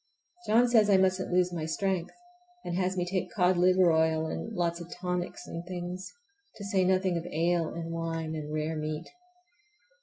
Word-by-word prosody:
John 235 Hz, +3 st, +5 dB
says 220 Hz, -3 st, +4 dB
I 195 Hz, -, +6 dB
musn't 185 Hz, 0 st, +1 dB
lose 180 Hz, 0 st, +2 dB
my 160 Hz, -2 st, -3 dB
strength, 185 Hz, +1 st, -1 dB, 0.5 s
and 175 Hz, -, -2 dB
has 185 Hz, 0 st, 0 dB
me 180 Hz, -, 0 dB
take 185 Hz, +1 st, -2 dB
cod 185 Hz, -3 st, +3 dB
liver 180 Hz, 0 st, +5 dB
oil 160 Hz, 0 st, +2 dB
and 190 Hz, +7 st, -4 dB
lots 170 Hz, -4 st, -1 dB
of 170 Hz, -, -9 dB
tonics 180 Hz, 0 st, -4 dB
and 170 Hz, -, -6 dB
things, 180 Hz, +1 st, -5 dB, 0.4 s
to 200 Hz, -, -8 dB
say 195 Hz, -2 st, +2 dB
nothing 185 Hz, -1 st, +2 dB
of 170 Hz, -, -4 dB
ale 165 Hz, +1 st, +1 dB
and 165 Hz, 0 st, -5 dB
wine 165 Hz, -1 st, -3 dB
and 150 Hz, -1 st, -5 dB
rare 155 Hz, +1 st, -2 dB
meat. 155 Hz, +1 st, -4 dB
175 Hz, 180 wpm, -29 LUFS, 165-185 Hz, 0.5 s, I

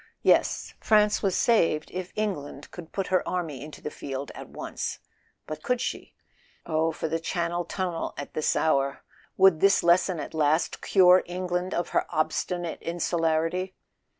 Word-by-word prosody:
Yes; -, -, +2 dB
France 210 Hz, -1 st, +3 dB
was 195 Hz, -3 st, +1 dB
saved 165 Hz, -9 st, +2 dB
if 185 Hz, 0 st, -5 dB
England 175 Hz, -9 st, -4 dB
could 170 Hz, -2 st, -10 dB
put 195 Hz, -2 st, -3 dB
her 185 Hz, -, +4 dB
army 160 Hz, -7 st, -3 dB
into 150 Hz, 0 st, -10 dB
the 150 Hz, -, -5 dB
field 135 Hz, 0 st, -6 dB
at -, -, -10 dB
once. -, -, -5 dB, 0.5 s
But 155 Hz, -, -6 dB
could 250 Hz, -1 st, 0 dB
she? 250 Hz, -, -4 dB, 0.5 s
Oh, 160 Hz, 0 st, +1 dB
for 160 Hz, -, -3 dB
the 165 Hz, +1 st, -1 dB
Channel 170 Hz, +1 st, -2 dB
tunnel 180 Hz, -2 st, -3 dB
at 145 Hz, -, -7 dB
this 155 Hz, -, +1 dB
hour! 140 Hz, -3 st, +1 dB, 0.3 s
Would 190 Hz, -4 st, +6 dB
this 195 Hz, +2 st, +4 dB
lesson 175 Hz, 0 st, +3 dB
at 145 Hz, -, -6 dB
last 155 Hz, +1 st, +1 dB
cure 185 Hz, -1 st, +6 dB
England 180 Hz, +1 st, -2 dB
of 175 Hz, -, -1 dB
her -, -, 0 dB
obstinate 165 Hz, +2 st, -2 dB
insularity? 170 Hz, +1 st, -1 dB
170 Hz, 155 wpm, -27 LUFS, 155-185 Hz, 0.5 s, Would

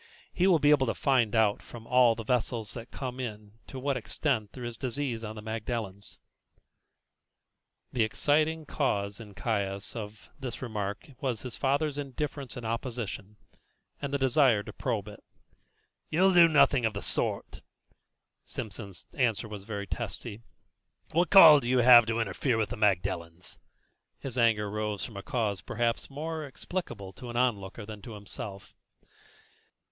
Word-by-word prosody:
"He 185 Hz, -, +2 dB
will 180 Hz, -3 st, +6 dB
be 150 Hz, -1 st, +4 dB
able 135 Hz, -3 st, +4 dB
to -, -, 0 dB
find 120 Hz, -5 st, +2 dB
out 110 Hz, -2 st, +3 dB
from 115 Hz, -1 st, -11 dB
all 125 Hz, -2 st, +5 dB
the 115 Hz, -, -6 dB
vessels 115 Hz, -2 st, -1 dB
that 115 Hz, 0 st, -8 dB
come 130 Hz, -1 st, -6 dB
in 105 Hz, -3 st, -7 dB
to 135 Hz, -, -8 dB
what 135 Hz, +1 st, -1 dB
extent 115 Hz, -3 st, -2 dB
there 125 Hz, -, -8 dB
is 120 Hz, -1 st, -5 dB
disease 125 Hz, -1 st, -3 dB
on 110 Hz, 0 st, -6 dB
the 105 Hz, -, -8 dB
Magdalens." 110 Hz, -3 st, -4 dB, 1.8 s
The 120 Hz, -, +1 dB
exciting 155 Hz, +8 st, +2 dB
cause 100 Hz, -9 st, -1 dB
in 105 Hz, -3 st, -11 dB
Caius 100 Hz, -3 st, -2 dB
of 105 Hz, -1 st, -8 dB
this 130 Hz, -3 st, -5 dB
remark 105 Hz, -2 st, -4 dB
was 125 Hz, -5 st, -2 dB
his 125 Hz, -2 st, -6 dB
father's 145 Hz, +1 st, 0 dB
indifference 140 Hz, -1 st, -5 dB
and 120 Hz, -, -6 dB
opposition, 115 Hz, -3 st, -4 dB, 0.7 s
and 140 Hz, -1 st, -3 dB
the 140 Hz, -, +1 dB
desire 130 Hz, -5 st, +4 dB
to -, -, -9 dB
probe -, -, -2 dB
it. -, -, -11 dB, 0.9 s
"You'll 185 Hz, +4 st, +4 dB
do 175 Hz, -1 st, +8 dB
nothing 140 Hz, -4 st, +4 dB
of 110 Hz, -2 st, 0 dB
the 100 Hz, -, -4 dB
sort." -, -, -2 dB, 0.8 s
Simpson's 100 Hz, -3 st, -7 dB
answer 120 Hz, -4 st, 0 dB
was 105 Hz, -2 st, -8 dB
very 100 Hz, -2 st, -4 dB
testy. 100 Hz, +2 st, -5 dB, 0.7 s
"What 175 Hz, +3 st, +2 dB
call 165 Hz, -7 st, +10 dB
have -, -, -12 dB
you 125 Hz, +1 st, +2 dB
to 120 Hz, -2 st, +7 dB
interfere 115 Hz, +4 st, 0 dB
with 110 Hz, -2 st, 0 dB
the 125 Hz, -, -4 dB
Magdalens?" 90 Hz, -5 st, -1 dB, 0.6 s
His 130 Hz, -3 st, -6 dB
anger 115 Hz, -4 st, +3 dB
rose 105 Hz, -1 st, -3 dB
from 115 Hz, -, -10 dB
a 100 Hz, -, -5 dB
cause 110 Hz, -6 st, -1 dB
perhaps 115 Hz, 0 st, -1 dB
more 155 Hz, +3 st, -4 dB
explicable 130 Hz, -, -6 dB
to 125 Hz, -2 st, -9 dB
an 120 Hz, -, -4 dB
onlooker 115 Hz, -4 st, -1 dB
than 105 Hz, -1 st, -9 dB
to 115 Hz, -, -9 dB
himself. 100 Hz, -1 st, -8 dB
115 Hz, 155 wpm, -29 LUFS, 105-135 Hz, 1.8 s, call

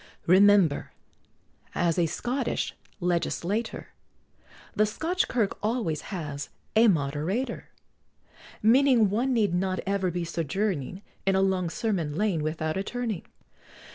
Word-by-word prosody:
Remember, 190 Hz, -4 st, +5 dB, 0.8 s
as 170 Hz, -1 st, +1 dB
a 170 Hz, -, +3 dB
Scottish 245 Hz, -, -2 dB, 0.3 s
legislator, 180 Hz, +5 st, -1 dB, 0.9 s
The 215 Hz, -, +3 dB
Scotch 335 Hz, -, -1 dB
Kirk 225 Hz, -5 st, 0 dB
always 210 Hz, -, -1 dB
has 150 Hz, -7 st, -5 dB, 0.3 s
a 225 Hz, +2 st, +6 dB
Moderator; 160 Hz, -, -1 dB, 0.9 s
Meaning 235 Hz, -2 st, +5 dB
one 245 Hz, +6 st, +1 dB
need 215 Hz, -7 st, +2 dB
not 185 Hz, 0 st, 0 dB
ever 195 Hz, -1 st, 0 dB
be 175 Hz, 0 st, -2 dB
sojourning 180 Hz, +1 st, -2 dB, 0.2 s
In 195 Hz, -, +4 dB
a 190 Hz, -, +3 dB
long 185 Hz, -3 st, +1 dB
Sermon 170 Hz, -7 st, -2 dB
Lane 195 Hz, -4 st, +1 dB
without 155 Hz, +2 st, -2 dB
a 195 Hz, -, -1 dB
turning. 230 Hz, -4 st, -4 dB
190 Hz, 115 wpm, -27 LUFS, 170-220 Hz, 0.9 s, a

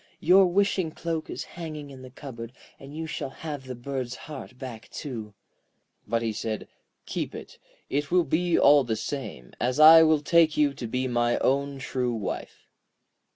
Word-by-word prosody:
Your 185 Hz, +3 st, +6 dB
wishing 185 Hz, -2 st, +1 dB
cloak 165 Hz, 0 st, -4 dB
is -, -, -4 dB
hanging 155 Hz, -4 st, -8 dB
in 130 Hz, -1 st, -11 dB
the 130 Hz, -, -10 dB
cupboard, 125 Hz, -3 st, -9 dB, 0.3 s
and 140 Hz, +3 st, -10 dB
you 160 Hz, -, -3 dB
shall 155 Hz, -, -4 dB
have 145 Hz, -1 st, -7 dB
the 130 Hz, -1 st, -6 dB
bird's 125 Hz, 0 st, -4 dB
heart 135 Hz, -4 st, -9 dB
back 125 Hz, -4 st, -8 dB
too.' 110 Hz, -8 st, -7 dB, 0.7 s
But 115 Hz, +2 st, 0 dB
he 110 Hz, -1 st, -1 dB
said: 110 Hz, 0 st, -4 dB, 0.4 s
'Keep -, -, -4 dB
it; -, -, -10 dB, 0.3 s
it 145 Hz, +1 st, -1 dB
will 180 Hz, 0 st, +4 dB
be 165 Hz, +3 st, +1 dB
all 145 Hz, 0 st, +6 dB
the 115 Hz, -3 st, -1 dB
same, 110 Hz, -, -6 dB
as 125 Hz, +4 st, 0 dB
I 160 Hz, +1 st, +10 dB
will 155 Hz, -2 st, +4 dB
take 160 Hz, +1 st, +4 dB
you 145 Hz, -2 st, +3 dB
to 120 Hz, -, -6 dB
be 130 Hz, +3 st, -1 dB
my 120 Hz, -1 st, +1 dB
own 140 Hz, +1 st, 0 dB
true 125 Hz, -2 st, -2 dB
wife.' 105 Hz, -4 st, -6 dB
140 Hz, 175 wpm, -26 LUFS, 120-155 Hz, 0.7 s, I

